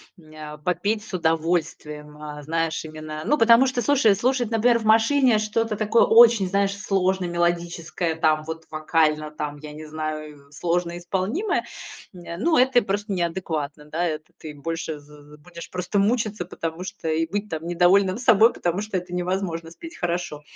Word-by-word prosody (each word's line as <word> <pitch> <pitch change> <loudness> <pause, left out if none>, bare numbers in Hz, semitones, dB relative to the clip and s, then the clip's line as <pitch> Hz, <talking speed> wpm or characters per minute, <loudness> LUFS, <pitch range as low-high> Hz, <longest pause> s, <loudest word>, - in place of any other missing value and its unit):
мне 155 -3 -13
а, 150 - -9
попеть 205 +7 -1
с 220 - -12
удовольствием. 160 -3 -1
А, 150 -1 -8
знаешь 165 +1 -2
именно, 155 0 -7
ну, 295 - +3
потому 230 +3 +6
что, 255 -2 -1
слушай, 250 -7 +4
слушать, 245 +2 0
например, 235 +2 +3
в 225 - -6
машине 225 +2 +4
что-то 215 +1 -1
такое 215 +2 +3
очень, 230 -3 +6
знаешь, 200 +1 0
сложно 190 -2 0
мелодическое, 170 -1 -1
там 155 -1 +2
вот 160 0 -7
вокально, 155 -1 0
там, 150 -1 -5
я 150 +1 -10
не 155 +1 -9
знаю, 155 -2 -6
сложно 175 +2 -2
исполнимое, 195 - -1 0.5
не, 175 -2 -8
ну, 320 - +2
это 255 -1 +4
просто 205 +1 -3
неадекватно. 165 -5 -3
Да, 160 +3 -3
это 155 -2 -4
ты 155 -1 -9
больше 160 +1 -5
з 145 - -19 0.3
з - - -19
будешь 170 +2 -11
просто 180 +2 -2
мучиться, 215 -3 0
потому 165 0 -5
что 185 -3 -7
и 160 +1 +1
быть 205 +2 -3
там 160 0 -5
недовольным 185 +3 +3
собой, 230 -2 +5
потому 175 +3 -2
что 210 -2 -3
это 180 0 -6
невозможно 180 -2 -3
спеть 330 - -11
хорошо. 175 -4 -3
175 Hz, 170 wpm, -23 LUFS, 155-210 Hz, 0.5 s, потому